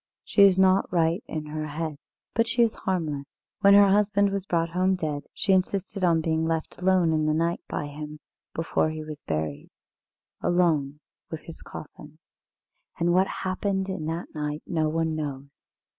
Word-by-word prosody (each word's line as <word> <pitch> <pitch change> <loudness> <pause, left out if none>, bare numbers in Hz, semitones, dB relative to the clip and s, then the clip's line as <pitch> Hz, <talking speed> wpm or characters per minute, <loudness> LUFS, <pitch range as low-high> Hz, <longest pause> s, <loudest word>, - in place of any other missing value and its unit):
She 205 - +2
is 195 -2 +7
not 190 0 +4
right 170 +3 +1
in 155 -1 -4
her 155 0 -4
head, 155 0 -4 0.3
but 230 0 +2
she 235 +1 +3
is 230 - +2
harmless. 155 -7 -3 0.2
When 200 0 +7
her 200 -1 +7
husband 200 0 +3
was 195 0 -3
brought 165 -1 +1
home 185 +2 +2
dead, 150 -5 -3
she 195 - +1
insisted 190 +1 0
on 165 -2 +4
being 160 0 0
left 160 +1 -2
alone 180 -3 +3
in 155 -1 +1
the 155 - +2
night 170 +2 0
by - - -2
him, 150 +1 -8 0.4
before 165 -1 +1
he 155 0 -5
was 155 -1 -8
buried 75 -2 -3 0.7
alone, 155 -5 +1 0.3
with 160 -2 -6
his 165 - -11
coffin. 150 0 -11 0.8
And 175 +1 +2
what 190 +2 +4 0.2
happened 190 +1 -1
in 185 -5 -3
that 165 +2 -4
night 150 -1 -3
no 160 -3 0
one 160 0 0
knows. 140 -2 -6
165 Hz, 175 wpm, -26 LUFS, 155-190 Hz, 0.8 s, is